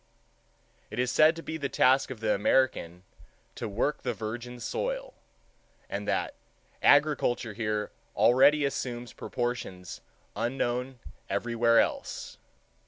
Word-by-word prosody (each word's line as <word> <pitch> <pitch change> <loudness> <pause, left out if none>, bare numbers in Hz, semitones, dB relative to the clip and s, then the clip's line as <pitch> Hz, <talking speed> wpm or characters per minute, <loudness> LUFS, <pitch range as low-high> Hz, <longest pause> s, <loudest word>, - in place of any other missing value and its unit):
It - - -8
is 125 0 +1
said 155 +4 +5
to 165 - -8
be 160 - -4
the 140 -3 -3
task 130 +1 +3
of 125 -4 -7
the 110 -1 +2
American 100 -6 +1 0.5
"to - - -5
work 130 +9 -1
the 125 -3 -2
virgin 120 +3 -6
soil," - - -3 0.8
and - - -4
that - - 0 0.5
"agriculture 145 -6 +3
here 105 -1 -2 0.2
already 140 +4 +5
assumes 120 -3 -4
proportions 120 -7 -4 0.3
unknown 125 +1 -2 0.3
everywhere 115 -1 +2
else." - - -2
125 Hz, 115 wpm, -28 LUFS, 115-140 Hz, 0.8 s, said